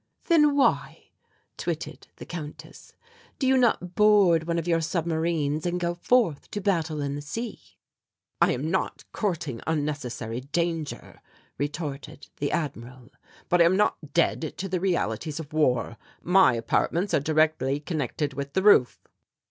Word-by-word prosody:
"Then 300 Hz, -4 st, +4 dB
why," 280 Hz, -, 0 dB, 0.5 s
twitted -, -, -5 dB
the -, -, -10 dB
Countess, 155 Hz, -4 st, -9 dB, 0.4 s
"do 270 Hz, -, -1 dB
you 265 Hz, 0 st, +4 dB
not 225 Hz, -8 st, +2 dB
board 195 Hz, -6 st, +4 dB
one 170 Hz, 0 st, 0 dB
of 165 Hz, 0 st, -2 dB
your 165 Hz, -1 st, +2 dB
submarines 160 Hz, -2 st, -1 dB
and 180 Hz, 0 st, -1 dB
go 175 Hz, 0 st, -1 dB
forth 175 Hz, -, +1 dB
to 205 Hz, -, -4 dB
battle 165 Hz, -6 st, 0 dB
in 140 Hz, -1 st, -2 dB
the 145 Hz, -, -5 dB
sea?" 225 Hz, +11 st, -7 dB, 0.6 s
"I -, -, +5 dB
am 145 Hz, +6 st, -3 dB
not 190 Hz, -, -2 dB
courting 170 Hz, -, -3 dB
unnecessary 145 Hz, -7 st, -3 dB
danger," 165 Hz, +2 st, -3 dB, 0.4 s
retorted 145 Hz, -1 st, -5 dB
the 145 Hz, -, -2 dB
Admiral; 125 Hz, -5 st, -5 dB, 0.4 s
"but 175 Hz, 0 st, +3 dB
I -, -, +7 dB
am 185 Hz, +3 st, +3 dB
not 210 Hz, -, +2 dB, 0.2 s
dead 165 Hz, -2 st, +1 dB
to 195 Hz, -, -3 dB
the 185 Hz, -1 st, -1 dB
realities 160 Hz, -, -1 dB
of 150 Hz, -2 st, -9 dB
war. 125 Hz, -6 st, +1 dB, 0.3 s
My 180 Hz, -7 st, +5 dB
apartments 170 Hz, -, 0 dB
are -, -, +4 dB
directly 155 Hz, -2 st, +1 dB
connected 145 Hz, -2 st, -3 dB
with 140 Hz, +1 st, -5 dB
the 190 Hz, -, +1 dB
roof." 200 Hz, -12 st, +5 dB
160 Hz, 150 wpm, -26 LUFS, 145-180 Hz, 0.6 s, I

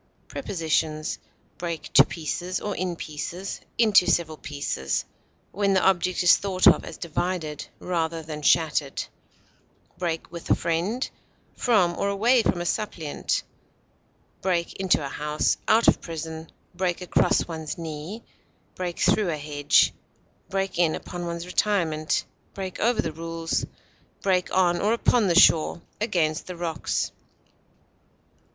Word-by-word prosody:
Prepositions: 160 Hz, -3 st, -1 dB, 0.4 s
Break 170 Hz, -2 st, -5 dB
to -, -, +9 dB
pieces, 175 Hz, +3 st, -3 dB
or 205 Hz, -1 st, -3 dB
in 180 Hz, -1 st, -2 dB
pieces, 170 Hz, +5 st, -5 dB, 0.2 s
into 215 Hz, -5 st, +5 dB
several 160 Hz, -2 st, +1 dB
pieces 140 Hz, -, -2 dB, 0.5 s
(when 200 Hz, 0 st, +1 dB
the 190 Hz, -, +3 dB
object 185 Hz, -1 st, +2 dB
is 175 Hz, -, +7 dB
thought 190 Hz, -2 st, 0 dB
of -, -, +7 dB
as -, -, -8 dB
divided 170 Hz, -2 st, -3 dB
rather 165 Hz, -2 st, -2 dB
than 155 Hz, -1 st, -6 dB
shattered); 150 Hz, -3 st, +2 dB, 1.0 s
break 165 Hz, -3 st, -3 dB
with 170 Hz, -1 st, -8 dB
a -, -, +6 dB
friend; 180 Hz, +10 st, -1 dB, 0.5 s
from 195 Hz, -8 st, +3 dB
or 200 Hz, -, +1 dB
away 230 Hz, +5 st, +4 dB
from 175 Hz, -5 st, 0 dB
a -, -, -3 dB
suppliant; 170 Hz, -6 st, -2 dB, 1.0 s
break 175 Hz, -2 st, 0 dB
into 185 Hz, -6 st, +1 dB
a -, -, -2 dB
house; 150 Hz, +2 st, 0 dB
out 225 Hz, +1 st, +4 dB
of -, -, +5 dB
prison; 160 Hz, -1 st, -6 dB, 0.2 s
break 180 Hz, 0 st, -1 dB
across 180 Hz, -, +2 dB
one's 160 Hz, -3 st, -5 dB
knee; 165 Hz, +6 st, -6 dB, 0.5 s
break 180 Hz, -2 st, -4 dB
through 190 Hz, +1 st, +3 dB
a 155 Hz, -, -1 dB
hedge; 145 Hz, -1 st, +3 dB, 0.6 s
break 195 Hz, -2 st, -2 dB
in 165 Hz, -3 st, +3 dB
upon 175 Hz, -1 st, -6 dB
one's 170 Hz, 0 st, -4 dB
retirement; 170 Hz, -5 st, 0 dB, 0.3 s
break 190 Hz, -2 st, -5 dB
over 235 Hz, +1 st, +2 dB
the 160 Hz, -, -2 dB
rules; 165 Hz, +1 st, -3 dB, 0.6 s
break 185 Hz, -2 st, +1 dB
on 175 Hz, -2 st, +3 dB
or 210 Hz, +3 st, +3 dB
upon 235 Hz, -2 st, +3 dB
the 175 Hz, 0 st, +5 dB
shore, 165 Hz, 0 st, +5 dB, 0.2 s
against 165 Hz, -8 st, 0 dB
the 180 Hz, -, -6 dB
rocks. 170 Hz, -2 st, -2 dB
175 Hz, 135 wpm, -25 LUFS, 160-190 Hz, 1.0 s, to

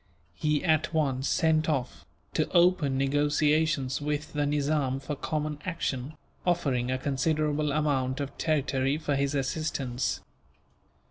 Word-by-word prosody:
He 150 Hz, -, 0 dB
at 155 Hz, 0 st, +1 dB
once 135 Hz, -3 st, +1 dB
sent 160 Hz, -1 st, +2 dB
off, 130 Hz, -5 st, -2 dB, 0.3 s
to -, -, 0 dB
open 170 Hz, -6 st, +4 dB
negotiations 145 Hz, 0 st, +1 dB
with 150 Hz, +1 st, -3 dB
the 145 Hz, -1 st, 0 dB
Nizam 145 Hz, -2 st, 0 dB
for 145 Hz, +2 st, -4 dB
common 150 Hz, +1 st, -3 dB
action, 150 Hz, -5 st, -3 dB, 0.3 s
offering 135 Hz, -9 st, +1 dB
a 130 Hz, -, +1 dB
considerable 150 Hz, +2 st, 0 dB
amount 140 Hz, -3 st, 0 dB
of 140 Hz, -1 st, -4 dB
territory 140 Hz, -3 st, +1 dB
for 150 Hz, -2 st, -1 dB
his 140 Hz, +1 st, 0 dB
assistance. 135 Hz, -2 st, -1 dB
145 Hz, 125 wpm, -28 LUFS, 135-155 Hz, 0.3 s, open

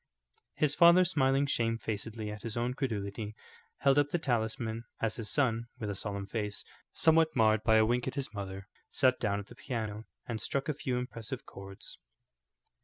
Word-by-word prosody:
His 150 Hz, -2 st, +2 dB
father, 170 Hz, +3 st, +7 dB
smiling 140 Hz, -5 st, +2 dB
shamefacedly 115 Hz, -3 st, -2 dB
at 105 Hz, 0 st, -7 dB
his 115 Hz, 0 st, -4 dB
own 120 Hz, +1 st, 0 dB
credulity, 110 Hz, -5 st, -3 dB, 0.5 s
held 140 Hz, +1 st, +5 dB
up 145 Hz, 0 st, +2 dB
the 175 Hz, -, +1 dB
talisman, 115 Hz, -4 st, -1 dB
as 115 Hz, -1 st, -1 dB
his 110 Hz, -3 st, -2 dB
son, 115 Hz, -5 st, +1 dB
with 110 Hz, -4 st, -3 dB
a -, -, -4 dB
solemn 100 Hz, 0 st, -3 dB
face, 105 Hz, 0 st, -3 dB, 0.3 s
somewhat 160 Hz, 0 st, +4 dB
marred 110 Hz, -2 st, +4 dB
by 110 Hz, -1 st, +5 dB
a 110 Hz, 0 st, +6 dB
wink 120 Hz, +2 st, +1 dB
at 130 Hz, -, -3 dB
his 135 Hz, -6 st, -3 dB
mother, 95 Hz, -1 st, -6 dB, 0.2 s
sat 130 Hz, -2 st, +3 dB
down 100 Hz, -2 st, 0 dB
at 100 Hz, -, -7 dB
the -, -, -14 dB
piano 110 Hz, -4 st, -4 dB, 0.2 s
and 115 Hz, -2 st, -3 dB
struck 140 Hz, +2 st, -1 dB
a 150 Hz, -, +1 dB
few 130 Hz, -3 st, -2 dB
impressive 125 Hz, 0 st, -5 dB
chords. 100 Hz, 0 st, -9 dB
115 Hz, 180 wpm, -31 LUFS, 105-135 Hz, 0.5 s, father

